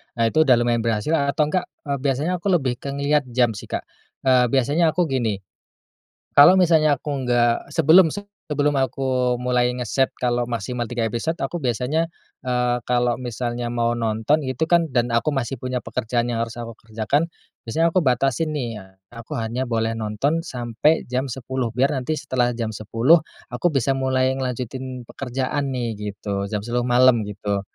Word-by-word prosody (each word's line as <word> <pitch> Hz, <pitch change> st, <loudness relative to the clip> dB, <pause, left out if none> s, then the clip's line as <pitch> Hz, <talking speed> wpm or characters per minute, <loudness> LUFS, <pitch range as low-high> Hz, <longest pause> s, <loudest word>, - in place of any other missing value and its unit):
Nah 115 Hz, -1 st, +1 dB
itu, 155 Hz, -1 st, +3 dB
udah 130 Hz, -, +7 dB
lumayan 120 Hz, 0 st, +1 dB
berhasil 115 Hz, +3 st, -1 dB
atau 150 Hz, -1 st, +1 dB
enggak, 185 Hz, -, 0 dB, 0.2 s
eee, 140 Hz, -2 st, -2 dB
biasanya 140 Hz, +5 st, 0 dB
aku 175 Hz, -, -4 dB
lebih 130 Hz, -7 st, -1 dB
ke 140 Hz, 0 st, -5 dB
ngelihat 140 Hz, 0 st, +1 dB
jam 120 Hz, -1 st, +2 dB
sih 105 Hz, -, -8 dB
Kak. -, -, -3 dB, 0.4 s
Eee, 130 Hz, -2 st, +4 dB
biasanya 145 Hz, +6 st, +2 dB
aku 180 Hz, -, +3 dB
gini, 130 Hz, -9 st, 0 dB, 1.0 s
kalau 175 Hz, +7 st, +8 dB
misalnya 155 Hz, -5 st, +4 dB
aku 145 Hz, -2 st, -4 dB
nggak, 120 Hz, -1 st, +1 dB
sebelum 165 Hz, +1 st, +5 dB, 0.4 s
sebelum 145 Hz, 0 st, +1 dB
aku 130 Hz, -1 st, 0 dB
mulai 125 Hz, 0 st, +1 dB
ngeset 125 Hz, +2 st, +1 dB
kalau 120 Hz, -1 st, 0 dB
maksimal 120 Hz, +1 st, -3 dB
3 120 Hz, -1 st, -2 dB
episode, 120 Hz, +9 st, -2 dB
aku 175 Hz, -, -3 dB
biasanya, 130 Hz, +6 st, 0 dB, 0.3 s
eee, 125 Hz, -1 st, 0 dB
kalau 120 Hz, -1 st, +2 dB
misalnya 120 Hz, 0 st, -3 dB
mau 120 Hz, 0 st, 0 dB
nonton 115 Hz, +6 st, 0 dB
gitu 130 Hz, +4 st, -1 dB
kan, 170 Hz, 0 st, +3 dB
dan 120 Hz, -2 st, 0 dB
aku 115 Hz, +6 st, +2 dB
masih 130 Hz, -2 st, -2 dB
punya 130 Hz, 0 st, -2 dB
pekerjaan 120 Hz, +1 st, -1 dB
yang 115 Hz, -, -1 dB
harus 115 Hz, 0 st, -4 dB
aku 115 Hz, -1 st, -6 dB
kerjakan, 115 Hz, +8 st, -1 dB, 0.4 s
biasanya 165 Hz, +8 st, +2 dB
aku 185 Hz, -, +4 dB
batasi 135 Hz, +2 st, +1 dB
nih, 120 Hz, -8 st, -3 dB, 0.3 s
aku 115 Hz, -1 st, -7 dB
hanya 120 Hz, +3 st, -2 dB
boleh 115 Hz, -1 st, 0 dB
nonton 110 Hz, +9 st, 0 dB
sampai 125 Hz, +1 st, 0 dB
jam 130 Hz, +2 st, 0 dB
10.00 130 Hz, 0 st, -3 dB
biar 135 Hz, +4 st, +2 dB
nanti 135 Hz, +3 st, -2 dB
setelah 130 Hz, -4 st, 0 dB
jam 115 Hz, -2 st, -2 dB
10.00 115 Hz, +10 st, +3 dB, 0.3 s
aku 120 Hz, +8 st, +1 dB
bisa 135 Hz, -4 st, +1 dB
mulai 130 Hz, -1 st, +1 dB
ngelanjutin 130 Hz, 0 st, -4 dB
pekerjaan 135 Hz, +2 st, -2 dB
nih, 120 Hz, -2 st, -2 dB, 0.2 s
gitu, 100 Hz, 0 st, -4 dB
jam 105 Hz, -1 st, -3 dB
10.00 120 Hz, +1 st, 0 dB
malam 125 Hz, 0 st, +5 dB
gitu. 100 Hz, 0 st, -2 dB
125 Hz, 170 wpm, -22 LUFS, 120-140 Hz, 1.0 s, kalau